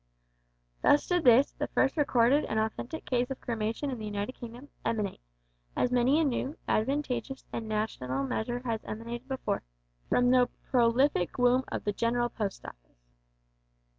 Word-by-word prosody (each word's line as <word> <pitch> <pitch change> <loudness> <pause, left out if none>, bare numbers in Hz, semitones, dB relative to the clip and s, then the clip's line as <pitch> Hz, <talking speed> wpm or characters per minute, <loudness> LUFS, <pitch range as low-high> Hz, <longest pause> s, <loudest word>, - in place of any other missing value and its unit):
Thus 290 - +4
did 355 -3 0
this, 250 +3 +6
the - - -4
first 270 - +1
recorded 275 -1 +3
and 220 - -2
authentic 230 +8 -3
case 245 -1 0
of 270 - -5
cremation 230 +4 -2
in 250 - -5
the 215 - -5
United 205 +2 -3
Kingdom, 245 +3 -10
emanate 210 -4 -1 0.6
as 250 - +1
many 250 +4 +3
a - - +3
new, 280 +2 -1
advantageous, 265 +1 -1
and 225 -1 -4
national 140 -12 -2
measure 240 - -2
has 225 -2 -2
emanated 235 +3 -6
before 265 -1 -2 0.5
from 245 0 +4
the 250 -1 +4 0.2
prolific 240 - +3
womb 250 +1 +3
of - - -3
the 205 - -1
General 240 +3 +1
Post 210 -4 -4
Office. - - -12
240 Hz, 155 wpm, -29 LUFS, 220-265 Hz, 0.6 s, this